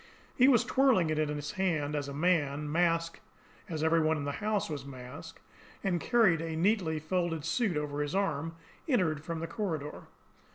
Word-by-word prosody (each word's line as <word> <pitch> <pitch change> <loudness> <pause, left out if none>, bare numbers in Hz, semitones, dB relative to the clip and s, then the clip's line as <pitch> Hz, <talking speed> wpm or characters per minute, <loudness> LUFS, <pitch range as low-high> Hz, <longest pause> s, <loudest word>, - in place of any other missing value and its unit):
He 255 - +5
was 245 -4 +5
twirling 245 -10 +3
it 155 - 0
in 155 -1 +1
his 145 -1 -4
hand, 165 -7 0
as 145 -1 -2
a - - -5
man, 150 -2 0
masked 165 0 +1 0.5
as 160 -2 -3
every 160 +1 +4
one 160 0 +2
in 145 - -4
the 145 - -1
house 210 -1 0
was 145 -4 -5
masked, 140 +5 -10 0.4
and 175 -4 0
carrying 215 -10 +3
a 165 -1 -3
neatly 175 -2 +1
folded 165 -1 -1
suit 215 -10 0
over 150 -1 -2
his 145 +4 -2
arm, 165 -4 -1 0.3
entered 165 - +1
from 165 0 -4
the - - -2
corridor. 160 -10 -4
165 Hz, 180 wpm, -31 LUFS, 150-185 Hz, 0.5 s, He